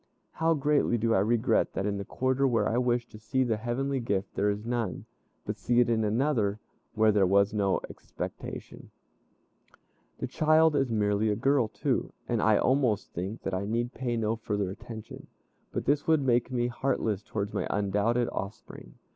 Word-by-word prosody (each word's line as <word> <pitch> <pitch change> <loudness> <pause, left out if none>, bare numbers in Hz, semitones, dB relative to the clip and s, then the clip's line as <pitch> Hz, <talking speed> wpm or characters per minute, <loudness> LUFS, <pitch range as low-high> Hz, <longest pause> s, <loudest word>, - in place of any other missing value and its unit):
How 165 +1 +1
greatly 145 -4 +2
do 115 0 +1
I 95 - +4
regret 110 +3 +2
that 95 - -2
in 100 -1 -1
the - - -3
quarter 130 +6 0
where 120 -3 +2
I 120 - +1
wished 120 -1 0
to 110 - -11
see 130 +4 0
the 115 -3 0
heavenly 130 +4 -1
gift, 100 -5 -2
there 105 - +1
is 105 +2 -3
none, 120 -1 -2 0.4
but - - -4
see 120 0 +2
it 120 -1 +3
in 110 -1 +2
another, 110 -2 +1 0.4
where 110 0 +4
there 100 -2 +3
was 100 +2 +3
no 100 -3 +1
expectation. - - -8 1.3
The - - -3
child 155 0 +3
is 135 -3 +1
merely 105 -1 +1
a 105 - +1
girl 130 +1 +2
too, - - -2
and - - 0
I - - +4
almost 125 -6 +1
think 95 +6 -5
that 95 - -3
I 95 +2 -1
need 120 +3 -1
pay 120 -2 -2
no 110 0 0
further 105 -4 -2
attention. 110 +2 -9 0.4
But - - -3
this 145 +1 +1
would 160 -3 +3
make 120 -2 +2
me 120 -2 0
heartless 120 -4 -1
towards 100 -1 -4
my - - -1
undoubted 105 +4 +1
offspring. 95 - -7
115 Hz, 180 wpm, -28 LUFS, 105-130 Hz, 1.3 s, I